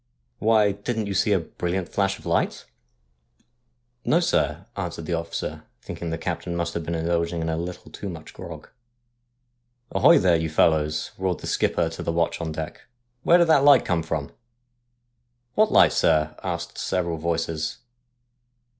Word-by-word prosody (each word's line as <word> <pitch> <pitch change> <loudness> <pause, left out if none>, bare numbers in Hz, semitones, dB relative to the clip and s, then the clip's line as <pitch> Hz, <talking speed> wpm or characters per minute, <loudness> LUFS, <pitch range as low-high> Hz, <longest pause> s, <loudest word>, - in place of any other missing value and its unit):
' - - -47
Why, 105 -2 +5
didn't 110 +2 -3
you 100 - -3
see 105 - +2
a 100 - +5
brilliant 90 +1 -3
flash 100 -1 0
of - - -17
light? - - 0 0.7
' 120 - -44
'No, 165 - +3
sir,' 175 - 0
answered 80 - -4
the 85 - -2
officer, 85 0 -4 0.2
thinking 85 - -5
the 80 - -2
captain 85 +2 -3
must 85 -1 -2
have 85 - -2
been 85 +1 -3
indulging 85 +1 0
in 80 0 -2
a 80 - 0
little 90 +2 -6
too 100 - -6
much 80 -3 -9
grog. - - -9 0.6
' 120 0 -47
Ahoy, - - +6
there, 90 -2 +4
you 80 0 -2
fellows,' 75 -1 +2
roared 95 -2 -1
the - - -7
skipper - - +1
to 80 - -7
the - - -1
watch 85 0 0
on 80 - -3
deck, 80 0 -6 0.2
' 120 0 -48
where 170 +6 +5
did 170 - +5
that 145 -4 +5
light 145 0 +7
come 90 -2 +1
from? 80 -3 -3 0.4
' 120 0 -49
' 120 0 -48
What 215 0 +3
light, - - +6
sir? 75 -1 +2
' - - -21
asked 85 -2 -4
several 85 -3 -1
voices. 80 -1 -2
90 Hz, 185 wpm, -24 LUFS, 80-120 Hz, 0.7 s, light